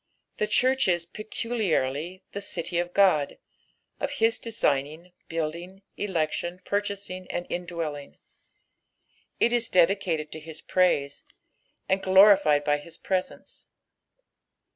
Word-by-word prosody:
The 210 - 0
church 260 +3 +3
is 175 -2 +1
peculiarly 185 - -2
the 200 - -4
" - - -3
OUy 170 +1 -1
of 175 - -5
Ood," 180 -8 +4 0.6
of 280 - -1
his 230 -5 +1
designing, 160 - -1 0.2
building, 170 +4 -4
election, 175 -2 -2
purchasing 200 -3 -3
and 175 - -3
in 175 0 -3
dwelling. 155 -5 -5 1.2
It 235 - +3
is 240 -1 +1
dedicated 175 -4 +2
to 160 - -7
his 160 0 -9
praise, 145 -6 +1 0.6
and 190 +1 +1
glorified 190 -6 +6
by 145 0 +2
his 160 +3 -11
presence. 185 -1 -4
180 Hz, 120 wpm, -26 LUFS, 155-200 Hz, 1.2 s, glorified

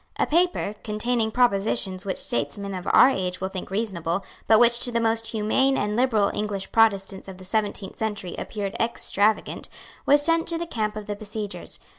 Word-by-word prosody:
A - - +2
paper, 345 - +1
containing 220 +1 0
propositions 200 -4 0
which 190 - -1
statesmen 195 - -3
of 185 -1 -6
our 255 - +7
age 180 -5 -2
will 190 - -2
think 190 -1 -6
reasonable, 190 -3 -2 0.2
but 220 -1 +6
which 240 0 +4
to 245 - -1
the 235 - +1
most 225 0 +1
humane 225 +5 +2
and 210 +1 -1
liberal 225 -4 +2
English 205 -2 -3
Protestants 195 -4 +2
of 190 -1 -9
the 185 - -11
seventeenth 205 -1 -2
century 205 -5 -3
appeared 205 -2 -4
extravagant, 215 -2 0 0.4
was 290 +1 +6
sent 330 0 +2
to 335 - +1
the 340 - -3
camp 215 -9 -2
of 215 -1 -6
the 205 - -4
besiegers. 210 0 -5
210 Hz, 180 wpm, -25 LUFS, 195-235 Hz, 0.4 s, our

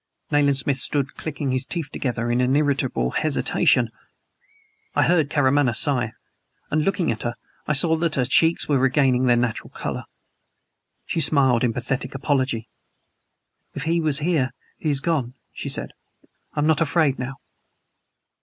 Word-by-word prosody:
Nayland 145 -2 +3
Smith 135 0 0
stood 140 +2 -1
clicking 145 -3 -4
his 130 +1 -1
teeth 160 -5 -4
together 120 -2 -2
in 125 +2 +2
irritable 140 - 0
hesitation. 155 -2 +1 1.0
I - - +4
heard 160 -5 +2
Karamaneh 140 -4 +2
sigh, 125 -5 +2 0.6
and, 155 - +2
looking 190 - 0
at 110 - -5
her, 120 0 -3 0.3
I 150 - +2
saw 160 +3 +5
that 165 -1 -1
her 130 - +1
cheeks 160 +6 +3
were 140 -3 +2
regaining 130 -1 +2
their 120 -1 +4
natural 120 -2 -2
color. - - -5 1.0
She 165 - -1
smiled 135 -5 +4
in 120 - +2
pathetic 125 +3 -3
apology. 130 -4 -1 1.1
"If 145 - -4
he 165 +1 +1
was 155 -3 +1
here 150 -6 0 0.3
he 155 - -2
is 140 -2 0
gone," 135 -7 -1 0.2
she - - -5
said. - - -2 0.6
"I - - -2
am - - +1
not 160 0 +2
afraid 155 -3 +2
now." 130 +1 -4
140 Hz, 155 wpm, -23 LUFS, 125-155 Hz, 1.1 s, saw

